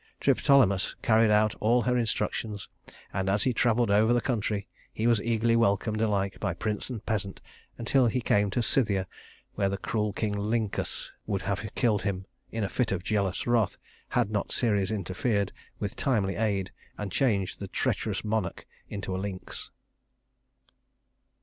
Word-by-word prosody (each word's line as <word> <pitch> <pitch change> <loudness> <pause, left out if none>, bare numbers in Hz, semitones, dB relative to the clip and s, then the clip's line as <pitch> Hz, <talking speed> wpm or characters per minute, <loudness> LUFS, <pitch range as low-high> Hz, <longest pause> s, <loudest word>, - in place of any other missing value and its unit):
Triptolemus 110 -9 +3
carried 110 0 +5
out 105 0 +4
all 120 +3 +3
her 125 0 +1
instructions; 110 -3 -1 0.5
and 95 0 0
as 100 +2 +2
he 130 - +2
traveled 115 -1 +2
over 110 +3 +5
the 120 - +4
country 105 -4 -1 0.2
he 110 - -3
was 115 -3 +4
eagerly 115 0 +2
welcomed 110 0 +2
alike 100 -3 0
by - - -1
prince 105 +2 -3
and 115 -4 -6
peasant 100 -4 -2 0.4
until 120 +2 +3
he 120 +3 +1
came 105 -3 +2
to 120 +5 0
Scythia, 105 -7 +2 0.5
where 100 - +1
the 100 - -2
cruel 105 0 -1
King 105 0 -1
Lyncus 105 +1 -2 0.2
would 100 -3 -1
have 100 0 -1
killed 110 -5 +2
him, 95 -2 -2 0.3
in 115 -1 -2
a - - +1
fit 120 +2 0
of 90 -2 -1
jealous 100 -2 0
wrath, 120 -5 +2 0.3
had 120 -4 +1
not 105 -2 -1
Ceres 100 -5 +1
interfered 100 +1 -1 0.3
with 100 - -4
timely 105 -9 +1
aid 100 -4 0 0.3
and 105 -2 -4
changed 100 -5 +1
the - - -5
treacherous - - -1
monarch 105 -4 -2 0.2
into 100 -2 -4
a - - -2
lynx. 95 -2 -5
105 Hz, 160 wpm, -28 LUFS, 100-115 Hz, 0.5 s, carried